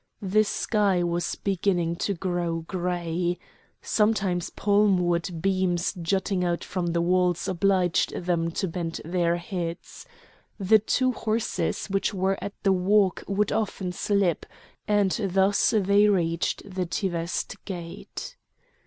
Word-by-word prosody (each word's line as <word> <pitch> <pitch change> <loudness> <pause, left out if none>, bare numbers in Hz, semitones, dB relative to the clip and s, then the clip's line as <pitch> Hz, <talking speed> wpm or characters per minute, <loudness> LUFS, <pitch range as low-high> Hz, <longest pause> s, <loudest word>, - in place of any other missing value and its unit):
The 205 +3 +3
sky 200 -3 +1
was 175 0 -1
beginning 180 -3 0
to 200 +2 -1
grow 175 -2 -2
grey. 175 0 -2 0.5
Sometimes 200 -5 +1
palm 205 -1 +3
wood 170 -1 -1
beams 185 -2 +1
jutting 190 +2 0
out 175 -1 -1
from 180 -2 -3
the 170 0 0
walls 180 -1 +1
obliged 185 -1 +1
them 170 -2 0
to 190 - -1
bend 165 -1 -4
their 170 0 +1
heads. 170 -1 -6 0.5
The 210 +3 +5
two 255 +5 +1
horses 225 -2 -1
which 195 +1 -1
were 190 +1 0
at 200 - -5
the 195 -1 +4
walk 190 +1 +2
would 200 +1 0
often 205 -4 -2
slip; 190 -2 0 0.4
and 205 -2 +3
thus 195 0 +2
they 200 +1 +4
reached 170 0 0
the 185 -2 -3
Teveste 170 -2 -3
gate. 175 -4 -7
185 Hz, 125 wpm, -26 LUFS, 175-200 Hz, 0.5 s, The